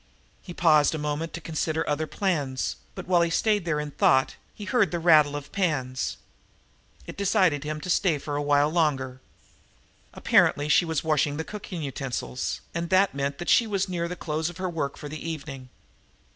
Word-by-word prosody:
He 185 - -10
paused 160 -3 +4
a - - -2
moment 150 +2 -3
to 170 - -5
consider 160 0 -2
other 155 +2 -1
plans, 150 -11 -1 0.2
but, 185 - -7
while 180 -2 +4
he 170 - +2
stayed 205 +2 +1
there 155 -3 0
in 150 0 -4
thought, 130 -1 +3 0.2
he 205 - -8
heard 225 -4 +2
the 175 - -2
rattle 155 -4 +5
of 145 -1 -7
pans. 135 -9 -1 0.9
It - - -8
decided 185 -7 +2
him 155 0 -4
to - - -7
stay 170 -5 +2
a 145 0 -3
while 145 +1 +3
longer. 135 -6 0 0.9
Apparently 145 +1 +2
she 175 - +4
was 160 -3 -2
washing 150 -2 +1
the 160 - -2
cooking 185 -4 -7
utensils, 135 -2 -4
and 170 0 -3
that 190 +1 +3
meant 140 0 -2
that 175 - -7
she 230 - +4
was 195 -2 -1
near 170 -2 -2
the 180 - -5
close 160 -1 -2
of 175 - -10
her 185 -1 -3
work 145 -4 -3
for 150 - -8
the 155 +1 -7
evening. 140 -5 -7
155 Hz, 185 wpm, -26 LUFS, 145-175 Hz, 0.9 s, rattle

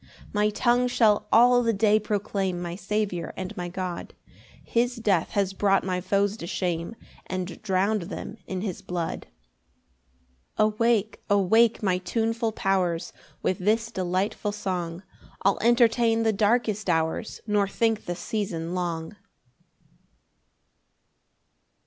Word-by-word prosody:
6 - - -23
[My 210 0 +2
tongue 245 +3 +2
shall 220 -4 +3
all 245 +2 +6
the 230 -1 +1
day 215 +1 +3
proclaim 200 -3 -2
My 175 -1 -4
Saviour 195 -3 -2
and 185 0 -5
my 175 -1 -4
God; 180 -1 -5 0.5
His 245 +1 0
death 205 -8 +1
has 195 -2 +1
brought 195 0 +2
my 185 -1 -1
foes 200 +2 +1
to 170 - -7
shame, 175 +3 -2 0.3
And 185 -1 -4
drown'd 200 +1 +1
them 225 - -6
in 185 -1 -3
his 190 -4 -4
blood. 175 -2 -4 1.3
7 215 0 +3
Awake, 220 -1 +1
awake 215 +4 +4
my 185 -2 +2
tuneful 225 +3 -1
powers; 185 -5 0 0.3
With 185 - 0
this 225 +4 +1
delightful 190 +2 -1
song 180 -4 -3 0.4
I'll 195 0 +3
entertain 230 -1 +4
the 220 -1 +2
darkest 215 -1 +1
hours, 160 +5 0
Nor 210 -2 +2
think 225 +2 0
the 175 - -3
season 175 -4 -3
long. 170 0 -3
200 Hz, 130 wpm, -26 LUFS, 180-220 Hz, 1.3 s, all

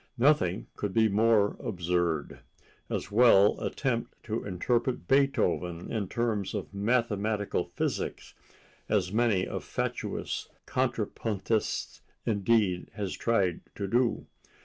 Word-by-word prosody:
Nothing 120 - +3
could 105 -2 -3
be 110 -1 +5
more 105 0 +3
absurd: 85 -4 -1 0.5
as - - -3
well 105 -3 +6
attempt 120 -4 -2
to 110 0 -3
interpret 115 +3 -1
Beethoven 90 -11 +1
in 105 -4 -1
terms 110 -3 -1
of - - -5
mathematical 105 -1 0
physics—as 95 -4 -4
many 110 -5 +2
a - - -4
fatuous - - -3 0.2
contrapuntist, 110 0 -1 0.2
indeed, 100 -4 +1
has 100 -4 -3
tried 95 -7 +1
to 100 - -3
do. 120 +4 +1
105 Hz, 100 wpm, -29 LUFS, 95-115 Hz, 0.5 s, well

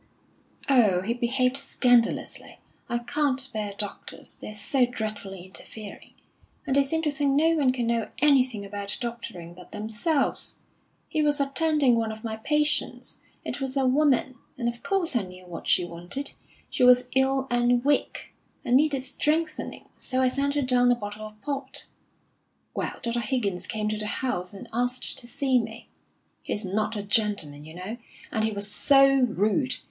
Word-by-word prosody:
"Oh, 220 -10 +4
he 220 +5 -1
behaved 250 +2 +1
scandalously. 245 -4 +1 0.3
I 240 - +1
can't 270 +1 0
bear 210 -2 -3
doctors, 205 -2 -5
they're 215 - -8
so 250 +5 +2
dreadfully 205 -6 -5
interfering. 205 +2 -9 0.5
And 270 -2 0
they 280 - +6
seem 320 +4 -1
to 300 - +1
think 285 -1 +1
no 310 +4 +4
one 285 -5 +3
can 250 -2 -2
know 230 -2 0
anything 255 -8 +3
about 200 0 -2
doctoring 230 -8 -6
but 180 0 -14
themselves! 230 +8 -1 0.5
He 310 - 0
was 295 -1 +2
attending 280 -1 +3
one 225 -1 0
of 220 0 -9
my 220 -1 -3
patients; 300 +6 0 0.3
it - - -4
was 265 0 -3
a 270 - +2
woman, 260 -2 +2 0.2
and 240 -2 -1
of 235 0 -3
course 340 +1 0
I 240 - +3
knew 185 -1 -10
what 175 -2 -8
she 180 - +4
wanted. 175 +11 -6 0.4
She 260 - +1
was 250 0 +6
ill 265 0 +3
and 240 +1 +2
weak, 290 - 0 0.3
and 245 - +5
needed 285 -2 +2
strengthening; 310 +3 -1
so 260 -1 0
I 260 -1 +4
sent 280 +2 0
her 290 - +1
down 245 -1 +4
a - - +4
bottle 210 -1 -6
of 215 0 -16
port. 275 -2 -2 0.9
Well, - - -3
Dr. 235 0 0
Higgins 215 -6 -1
came 215 -2 -2
to 215 0 -2
the 210 - -3
house, 205 -7 -2
and 200 - -10
asked 245 +2 -1
to 240 - -11
see 260 +1 +2
me. 225 0 -7 0.5
He's 210 - -3
not 215 +3 -1
a 205 - -3
gentleman, 200 -9 +2
you 160 +1 -11
know, 190 +6 -6 0.3
and 220 -2 0
he 220 - +2
was 200 -1 -1
so 275 +5 +6 0.2
rude! 220 - +1
240 Hz, 170 wpm, -26 LUFS, 210-275 Hz, 0.9 s, they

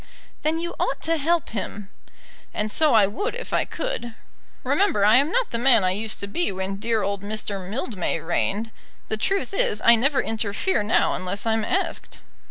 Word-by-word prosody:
"Then 315 +2 0
you 345 +1 -4
ought - - -1
to 330 0 +1
help 325 +2 0
him." 205 -1 -6 0.6
"And 210 0 -1
so 305 +1 +4
I 210 -3 +6
would 405 - -3
if - - -7
I - - +2
could. 240 - -4 0.5
Remember 380 - +2
I 215 +3 +7
am 280 +3 +3
not - - 0
the 230 - 0
man 240 -4 +5
I 185 - +2
used 215 +3 -2
to 200 - -3
be 345 +10 -1
when 190 +1 -3
dear 225 0 0
old 200 -1 -2
Mr. 200 -2 -4
Mildmay 205 -7 -2
reigned. 200 +7 -1 0.4
The 220 - -1
truth 390 - -1
is, 210 - +1
I 235 - +9
never 270 +5 +2
interfere 220 - 0
now 210 +2 +2
unless 185 +3 -2
I'm 225 -1 +1
asked." 380 - -2
220 Hz, 185 wpm, -24 LUFS, 200-295 Hz, 0.6 s, I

